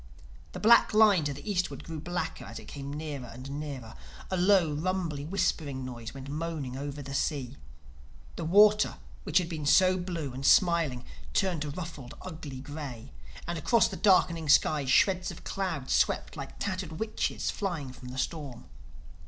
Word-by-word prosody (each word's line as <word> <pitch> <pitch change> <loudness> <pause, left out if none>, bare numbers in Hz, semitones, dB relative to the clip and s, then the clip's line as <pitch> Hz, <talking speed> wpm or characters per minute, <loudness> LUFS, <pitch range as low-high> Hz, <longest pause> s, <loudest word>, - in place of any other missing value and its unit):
The - - -5
black 230 0 +6
line 205 -7 +6
to 145 - -1
the 145 - -11
eastward 185 -3 -1
grew 160 -1 -6
blacker 175 -4 -4
as 115 +2 -8
it - - -10
came 140 -1 -7
nearer 145 -4 -5
and 130 +4 -9
nearer. 135 -7 -6 0.4
A - - +1
low, 180 -4 +4
rumbly, 165 -2 -2
whispering 155 -7 -1
noise 120 -3 -7
went 135 0 -9
moaning 150 -3 -4
over 140 +1 -5
the 140 +1 -7
sea. 140 -2 -1 0.8
The 170 - -4
water 210 +5 +5 0.3
which - - +2
had 180 -3 +2
been 155 -4 -4
so 185 +4 +5
blue 170 -7 -4
and 130 +2 -6
smiling 165 -6 +3 0.3
turned 185 -6 +1
to 150 - -2
a - - -3
ruffled 150 -5 -7
ugly 155 -7 -7
gray. 145 - -7 0.4
And 170 -1 -2
across 230 +9 +3
the - - -6
darkening 170 -6 +3
sky, 145 0 +4
shreds 180 +7 +3
of - - -9
cloud 170 -9 -3
swept - - +1
like - - -8
tattered 185 -4 -3
witches 215 +6 -2
flying 170 -10 -3
from 125 - -11
the 125 +1 -7
storm. 140 -4 -4
155 Hz, 170 wpm, -29 LUFS, 140-185 Hz, 0.8 s, black